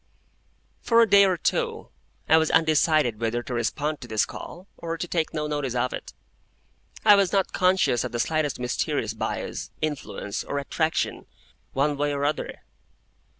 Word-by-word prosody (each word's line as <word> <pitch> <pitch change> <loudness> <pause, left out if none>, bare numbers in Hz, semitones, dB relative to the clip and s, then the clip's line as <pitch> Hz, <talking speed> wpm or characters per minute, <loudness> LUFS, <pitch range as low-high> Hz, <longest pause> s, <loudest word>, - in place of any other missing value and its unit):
For 230 -1 +3
a 230 - +5
day 200 -1 +7
or 185 -2 +1
two - - -1 0.4
I 160 - +6
was 160 -1 +2
undecided 155 -7 +3
whether 120 +1 -1
to 125 - -6
respond 145 +6 -2
to 120 - -8
this 110 -2 +1
call, 180 +2 -9
or 165 0 -5
take 165 -2 -1
no 155 -1 -2
notice 145 -4 -2
of 125 +1 0
it. - - -7 0.9
I - - +9
was 200 -3 +3
not 195 -2 +1
conscious 180 - +2
of - - -4
the 120 - -3
slightest 155 0 0
mysterious 125 -1 -1
bias, 110 - -4
influence, 145 -9 -4
or 140 - -4
attraction, 160 +3 -1 0.5
one 145 +2 +1
way 145 0 0
or 140 0 -1
other. 150 +1 -3
150 Hz, 160 wpm, -25 LUFS, 125-165 Hz, 0.9 s, I